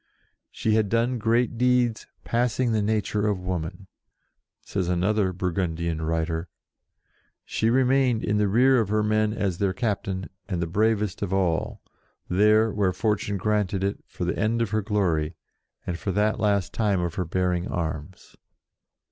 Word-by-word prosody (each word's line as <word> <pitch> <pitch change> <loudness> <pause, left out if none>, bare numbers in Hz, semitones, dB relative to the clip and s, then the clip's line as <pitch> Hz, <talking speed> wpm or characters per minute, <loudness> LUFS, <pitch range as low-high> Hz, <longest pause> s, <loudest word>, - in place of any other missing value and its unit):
"She 110 - -1
had 110 -2 +2
done 115 +2 +1
great 115 +2 +1
deeds, 125 -2 +2 0.2
passing 120 +1 0
the 110 -1 +1
nature 105 0 0
of 100 -3 0
woman." 90 0 -4 0.8
Says 95 -3 -2
another 95 +2 +1
Burgundian 85 -3 -2
writer: 80 +1 -2 1.0
"She 110 - 0
remained 130 -1 +3
in 105 0 +1
the 105 - +3
rear 125 +5 +4
of 110 -4 0
her 105 0 +1
men 110 0 +2
as 100 -5 -2
their 100 -2 +1
captain, 95 - -2 0.2
and 90 - -1
the 85 - 0
bravest 105 +2 0
of 100 -3 -2
all, 90 -4 0 0.4
there, 105 +4 +4
where 100 -3 +1
fortune 100 +1 -1
granted 100 -1 0
it, 100 +1 -1
for - - -5
the - - -1
end 110 +3 +1
of 115 -4 -1
her 110 0 +1
glory, 90 -7 0 0.5
and 85 -2 -3
for 100 - -2
that 105 +3 +1
last 100 -4 +1
time 105 -4 +1
of 85 -2 -2
her 90 - -2
bearing 90 +1 0
arms." 80 +1 -5
100 Hz, 155 wpm, -25 LUFS, 90-110 Hz, 1.0 s, rear